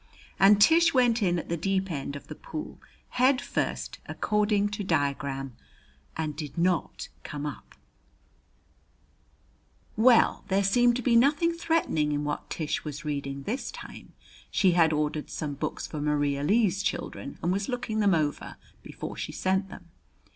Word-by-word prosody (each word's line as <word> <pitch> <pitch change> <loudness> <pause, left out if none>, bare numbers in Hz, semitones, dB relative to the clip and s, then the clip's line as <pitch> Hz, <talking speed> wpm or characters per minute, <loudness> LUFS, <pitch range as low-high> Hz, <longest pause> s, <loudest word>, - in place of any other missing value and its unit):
And 200 +1 +6
Tish 330 +7 +5
went 240 -2 +3
in 175 -3 +2
at - - -5
the 170 - -1
deep 190 +2 -1
end 140 -2 -4
of 145 - -9
the - - -8
pool, 310 - -8 0.3
head 255 +1 +3
first, - - -3
according 210 -1 +1
to 205 0 -4
diagram, 140 -5 -1 0.6
and 155 -2 -2
did 150 +1 -7
not 175 0 0
come 145 0 -5
up. 145 - -8 2.2
Well, 230 +2 +4
there 195 +1 +2
seemed 240 +5 +4
to 250 - -3
be 235 0 +3
nothing 290 +7 +4
threatening 320 - 0
in 145 0 -1
what 145 0 -4
Tish 155 -3 -2
was 150 -1 -7
reading 140 -2 -3
this 240 - -3
time. - - -10 0.4
She 190 - +3
had 170 -2 +4
ordered 150 0 -1
some 150 -3 -4
books 140 - -4
for 150 - -6
Maria 145 -1 0
Lee's 195 +3 +2
children - - -4
and 175 - +1
was 195 +4 -1
looking 240 -3 -2
them 200 -4 +4
over 150 -2 -2 0.3
before - - -7
she - - -5
sent 190 +1 0
them. 175 -3 -12
185 Hz, 155 wpm, -27 LUFS, 150-220 Hz, 2.2 s, And